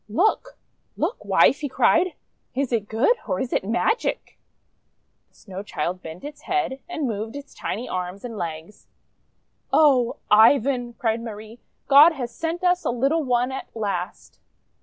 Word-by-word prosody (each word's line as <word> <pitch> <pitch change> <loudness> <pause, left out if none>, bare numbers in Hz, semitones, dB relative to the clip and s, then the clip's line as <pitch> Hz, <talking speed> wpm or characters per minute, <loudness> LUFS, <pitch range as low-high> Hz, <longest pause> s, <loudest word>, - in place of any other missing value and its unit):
"Look! 430 - 0 0.4
Look, - - -2
Wife!" - - +4
he 290 -3 -3
cried. 365 +7 +3 0.4
"Is 270 -1 -1
it 215 -3 -1
good, 250 - +2
or 185 -3 -1
is 255 - -3
it - - +1
magic?5 235 - -5
The - - -36
Snow 190 -2 -8
Child 180 -2 -4
bent 160 +2 -9
its 295 0 -9
head, 365 -8 0
and 315 -5 -2
moved 220 +2 -4
its 285 0 -9
tiny 230 +6 -4
arms 185 +3 -5
and 235 -2 -6
legs. 165 +1 -7 0.8
"Oh! 270 -6 +4 0.2
Ivan!" 240 +3 +4
cried 230 -1 -1
Marie. 220 0 -9 0.3
"God 295 +4 +8
has 245 -5 -5
sent 335 +2 -4
us 360 0 +2
a - - -1
little 275 +7 +1
one 250 -1 +1
at 265 - -6
last!' 200 -4 -4
240 Hz, 155 wpm, -23 LUFS, 210-290 Hz, 0.8 s, God